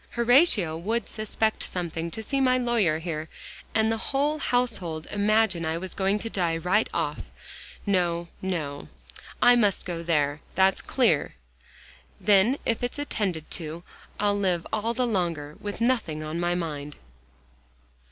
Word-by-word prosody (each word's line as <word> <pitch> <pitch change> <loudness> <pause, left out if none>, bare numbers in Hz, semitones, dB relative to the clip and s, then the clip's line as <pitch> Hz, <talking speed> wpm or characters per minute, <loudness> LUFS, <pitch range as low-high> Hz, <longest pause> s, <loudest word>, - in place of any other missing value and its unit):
Horatio 235 - +5
would 225 +7 -1
suspect 220 0 -1
something 170 -2 -3
to 220 +6 -6
see 275 +4 -1
my 255 -1 +4
lawyer 235 -10 +2
here, 160 -1 -4 0.5
and 220 0 +3
the 225 - -1
whole 290 +3 +1
household 215 - -1
imagine 205 -3 +2
I 160 0 -1
was 185 +1 -6
going 195 +1 +1
to - - -1
die 175 -6 0
right 185 +6 +1
off. 150 -3 -2 0.7
No, 175 -4 +1
no; 155 -7 -3 0.6
I 245 0 +8
must 210 -5 +2
go 170 -2 -4
there, 150 -3 0
that's 190 0 +3
clear. 215 - +1 0.8
Then 205 +6 +4
if 230 - 0
it's 245 - -2
attended 200 - -2
to, 165 0 -5 0.4
I'll 205 0 +2
live 180 -4 0
all 225 +2 0
the 250 +1 +1
longer, 170 -9 -2
with 205 -1 -5
nothing 230 -11 0
on 155 +2 -4
my 175 0 +1
mind." 150 -4 -4
190 Hz, 145 wpm, -26 LUFS, 165-225 Hz, 0.8 s, I